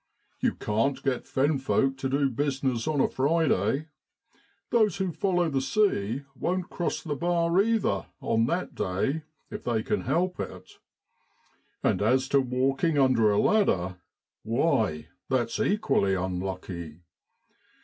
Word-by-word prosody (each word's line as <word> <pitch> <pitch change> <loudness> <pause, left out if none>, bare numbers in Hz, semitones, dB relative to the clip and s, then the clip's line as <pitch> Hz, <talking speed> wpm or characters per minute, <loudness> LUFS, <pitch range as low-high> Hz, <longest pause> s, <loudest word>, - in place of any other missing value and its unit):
You - - +1
can't 115 +6 -1
get 135 -3 -1
fen 140 +2 +1
folk 135 0 +1
to 135 - -2
do 140 +1 +2
business 135 -2 -1
on 155 -2 0
a - - +4
Friday 145 - +1 0.8
those 220 -6 +3
who 190 -2 -1
follow 180 0 +1
the 140 -4 0
sea 135 - +1
won't 180 +7 -2
cross 175 - -2
the 150 -3 -3
bar, 170 +3 +2
either, 215 - 0
on 115 +1 +1
that 175 +6 -2
day, 100 +12 -1 0.3
if - - -6
they 115 -3 0
can 210 - -1
help 180 +2 0
it; - - -7 1.0
and - - +2
as 130 +5 +2
to 140 - +4
walking 135 +5 0
under 130 -5 +4
a 100 - +2
ladder, 95 - +2 0.4
why, 110 - 0 0.2
it's 120 -3 0
equally 135 - +2
unlucky. 90 -3 -4
135 Hz, 135 wpm, -27 LUFS, 110-170 Hz, 1.0 s, a